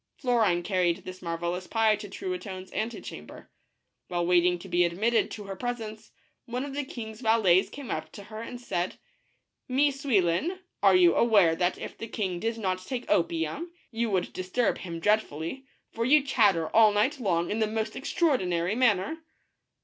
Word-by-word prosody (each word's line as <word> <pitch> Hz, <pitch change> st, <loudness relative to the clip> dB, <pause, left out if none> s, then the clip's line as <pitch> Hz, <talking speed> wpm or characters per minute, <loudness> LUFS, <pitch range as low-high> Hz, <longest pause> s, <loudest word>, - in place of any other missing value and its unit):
Florine 220 Hz, -9 st, +2 dB
carried 180 Hz, -1 st, 0 dB
this 185 Hz, 0 st, -8 dB
marvelous 175 Hz, +1 st, -3 dB
pie 220 Hz, -1 st, +3 dB
to 205 Hz, -1 st, -8 dB
Truitonne's 205 Hz, -, -6 dB
antecham 225 Hz, +2 st, -5 dB
ber. -, -, -13 dB, 0.6 s
While 175 Hz, -1 st, -1 dB
waiting 180 Hz, 0 st, +3 dB
to 175 Hz, -, -11 dB
be 175 Hz, 0 st, +3 dB
admitted 210 Hz, +7 st, +1 dB
to 210 Hz, -, -7 dB
her 195 Hz, -1 st, -6 dB
presence, 225 Hz, -2 st, -5 dB, 0.4 s
one 250 Hz, +3 st, -3 dB
of 280 Hz, -, -7 dB
the 290 Hz, +1 st, -2 dB
king's 225 Hz, -4 st, -8 dB
valets 220 Hz, -6 st, +4 dB
came 280 Hz, -3 st, -8 dB
up -, -, -4 dB
to 205 Hz, -, -9 dB
her 215 Hz, +2 st, -8 dB
and 240 Hz, +1 st, -7 dB
said, 180 Hz, -7 st, -2 dB, 0.4 s
" -, -, -43 dB, 0.3 s
Mie 280 Hz, +3 st, +3 dB
Souillon, 265 Hz, -, +1 dB, 0.2 s
are 195 Hz, -2 st, +6 dB
you 175 Hz, -2 st, +6 dB
aware 200 Hz, -8 st, +4 dB
that 175 Hz, +1 st, 0 dB
if -, -, -7 dB
the 225 Hz, -, -5 dB
king 190 Hz, -6 st, -3 dB
did 225 Hz, +4 st, -2 dB
not 185 Hz, -4 st, -2 dB
take 250 Hz, +4 st, -5 dB
opium, 170 Hz, -, 0 dB, 0.2 s
you 230 Hz, 0 st, -1 dB
would 185 Hz, -3 st, -1 dB
disturb 185 Hz, +6 st, 0 dB
him 170 Hz, -2 st, -6 dB
dreadfully, 210 Hz, -, -1 dB, 0.2 s
for 230 Hz, -, -2 dB
you 285 Hz, +4 st, +5 dB
chatter 205 Hz, -, +2 dB
all 220 Hz, -1 st, +7 dB
night 240 Hz, +8 st, +1 dB
long 175 Hz, -7 st, 0 dB
in 215 Hz, -, -1 dB
the 220 Hz, -, +2 dB
most 220 Hz, 0 st, -3 dB
extraordinary 190 Hz, -, 0 dB
manner?" 250 Hz, -, +2 dB
210 Hz, 175 wpm, -28 LUFS, 180-240 Hz, 0.6 s, all